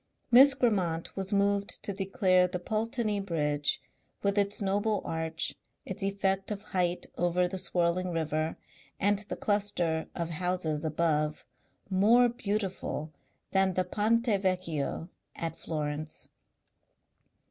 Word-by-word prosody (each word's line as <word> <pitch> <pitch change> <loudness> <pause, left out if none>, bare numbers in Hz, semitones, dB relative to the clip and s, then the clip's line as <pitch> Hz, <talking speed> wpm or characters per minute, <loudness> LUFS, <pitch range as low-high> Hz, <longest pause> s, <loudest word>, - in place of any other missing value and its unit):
Miss 270 +3 +9
Grammont 185 -10 0
was 195 0 -2
moved 200 0 +1
to 200 - -2
declare 190 -1 +3
the 180 - -3
Pulteney 215 +2 -1
Bridge, 150 -6 0 0.4
with 200 0 +2
its 200 0 +1
noble 205 +1 0
arch, 160 0 -2 0.3
its 190 - -6
effect 195 -1 0
of 205 -1 -4
height 180 -4 0
over 175 +1 +2
the 185 +1 -3
swirling 180 +1 +1
river, 160 -1 -1 0.4
and 205 +1 +3
the 205 - -5
cluster 195 -6 0
of 170 -1 -2
houses 170 -2 -1
above, 155 -1 0 0.4
more 220 +6 +5
beautiful 200 -8 -3 0.4
than 190 -1 +2
the 185 - +2
Ponte 220 +5 +1 0.2
Vecchio 170 -5 -1 0.3
at 165 -1 -4
Florence. 150 -1 -4
185 Hz, 120 wpm, -30 LUFS, 165-205 Hz, 0.4 s, Miss